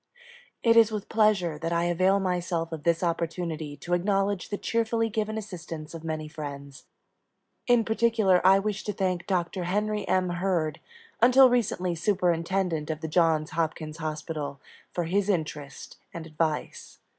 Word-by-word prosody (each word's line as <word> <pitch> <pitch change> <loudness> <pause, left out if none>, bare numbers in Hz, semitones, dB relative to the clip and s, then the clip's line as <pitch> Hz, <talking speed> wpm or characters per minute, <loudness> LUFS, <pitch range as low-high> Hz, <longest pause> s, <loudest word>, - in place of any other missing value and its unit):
It 230 -1 +5
is 225 -1 +6
with 210 -2 -5
pleasure 205 -8 +2
that 165 +1 -3
I 170 0 +1
avail 185 +3 +2
myself 175 -3 -1
of 160 -2 -5
this 170 +1 +2
opportunity 165 -3 -2
to 175 +5 -4
acknowledge 195 +1 0
the 205 - -2
cheerfully 225 0 0
given 215 0 -2
assistance 170 -7 -7
of 165 -1 -8
many 155 -1 -4
friends. 140 -3 -8 0.8
In 240 -2 +4
particular 220 -5 +3
I 190 +1 +7
wish 205 +1 -2
to 210 - -2
thank 185 -2 -1
Doctor 180 -1 -1
Henry 210 +2 -1
M. 185 -1 +2
Hurd, 175 -4 -1 0.4
until 255 +2 +7
recently 200 -7 0
Superintendent 175 -2 0
of 155 0 -3
the 160 - -3
Johns 160 -1 +2
Hopkins 155 -1 -3
Hospital, 155 -2 -4 0.3
for 175 - -2
his 195 +4 0
interest 150 -6 -3 0.2
and 165 -1 -6
advice. 155 -1 -3
175 Hz, 150 wpm, -27 LUFS, 160-205 Hz, 0.8 s, I